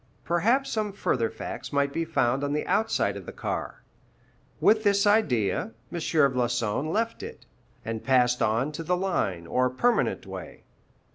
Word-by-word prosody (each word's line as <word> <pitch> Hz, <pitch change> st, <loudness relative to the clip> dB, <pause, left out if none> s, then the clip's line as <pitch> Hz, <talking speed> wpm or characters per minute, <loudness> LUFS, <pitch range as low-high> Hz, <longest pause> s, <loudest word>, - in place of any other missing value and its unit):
Perhaps 235 Hz, +11 st, +1 dB
some 215 Hz, -2 st, -1 dB
further 115 Hz, -, 0 dB
facts -, -, -7 dB
might 140 Hz, -1 st, +1 dB
be 165 Hz, -, -1 dB
found 135 Hz, -4 st, +1 dB
on 145 Hz, 0 st, -1 dB
the 150 Hz, -, -1 dB
outside 220 Hz, +1 st, +1 dB
of -, -, -9 dB
the -, -, -5 dB
car. -, -, -5 dB, 0.8 s
With 215 Hz, 0 st, +4 dB
this 200 Hz, -1 st, +3 dB
idea, 125 Hz, -, +2 dB, 0.2 s
M. 175 Hz, -, -4 dB
Floçon 125 Hz, -4 st, +1 dB
left 225 Hz, +3 st, -1 dB
it, -, -, -9 dB, 0.4 s
and 115 Hz, -1 st, -4 dB
passed 125 Hz, -2 st, +3 dB
on 115 Hz, +7 st, +1 dB
to 155 Hz, -, -6 dB
the 180 Hz, +2 st, 0 dB
line 110 Hz, -, -1 dB
or 125 Hz, +9 st, +1 dB
permanent 235 Hz, -, +1 dB
way. -, -, -9 dB
145 Hz, 155 wpm, -27 LUFS, 125-200 Hz, 0.8 s, With